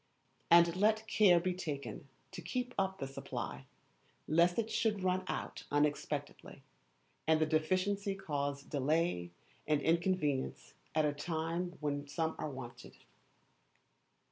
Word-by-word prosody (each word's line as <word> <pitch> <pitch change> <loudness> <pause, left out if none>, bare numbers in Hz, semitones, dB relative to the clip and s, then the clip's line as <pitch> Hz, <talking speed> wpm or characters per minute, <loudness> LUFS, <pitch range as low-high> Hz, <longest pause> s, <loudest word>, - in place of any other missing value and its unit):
And 170 0 +7
let 215 +2 +3
care 205 -5 +5
be 185 +1 -1
taken 150 -5 -5 0.2
to 185 -2 -7
keep 250 +8 -3
up 190 0 0
the 135 - -3
supply, 65 - -6 0.6
lest 170 +3 +4
it 225 -1 -1
should 210 -4 +1
run 185 0 +1
out - - -4
unexpectedly, 145 0 -1 0.6
and 160 0 +5
the 155 - +3
deficiency 185 +6 +1
cause 145 -6 -3
delay 145 - 0 0.4
and 150 -1 +3
inconvenience 165 -3 0 0.2
at 155 -1 +4
a 145 - +1
time 165 +3 -3
when 145 -1 -2
some 160 +2 -1
are 155 - -2
wanted. 120 -3 -9
165 Hz, 125 wpm, -34 LUFS, 145-185 Hz, 0.6 s, And